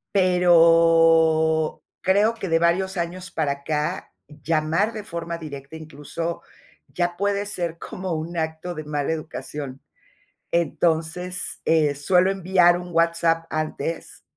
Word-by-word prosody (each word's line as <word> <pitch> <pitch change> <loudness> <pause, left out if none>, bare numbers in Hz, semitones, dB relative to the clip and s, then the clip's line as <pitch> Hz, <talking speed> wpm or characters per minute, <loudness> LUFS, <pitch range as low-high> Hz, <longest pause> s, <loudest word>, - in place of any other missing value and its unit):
Pero, 165 -3 +4 0.2
creo 205 +4 +3
que, 195 -5 -6
de 165 0 +3
varios 185 +3 +1
años 180 +2 -4
para 150 -3 0
acá, 150 +2 -3 0.2
llamar 155 +6 0
de 215 -2 -7
forma 170 -3 -5
directa, 150 -1 -9
incluso 160 +2 -6 0.5
ya 175 0 -2
puede 200 +2 -1
ser 175 -5 -3
como 185 +1 -5
un 160 +2 -4
acto 160 +2 -3
de 155 - -5
mala 150 0 -2
educación. 150 -3 -6 0.7
Entonces, 170 +2 -1
eh, 155 -3 +3
suelo 180 +6 +2
enviar 180 -2 +3
un 180 0 -8
WhatsApp 165 0 +2
antes, 155 +1 -4
165 Hz, 120 wpm, -23 LUFS, 160-180 Hz, 0.7 s, Pero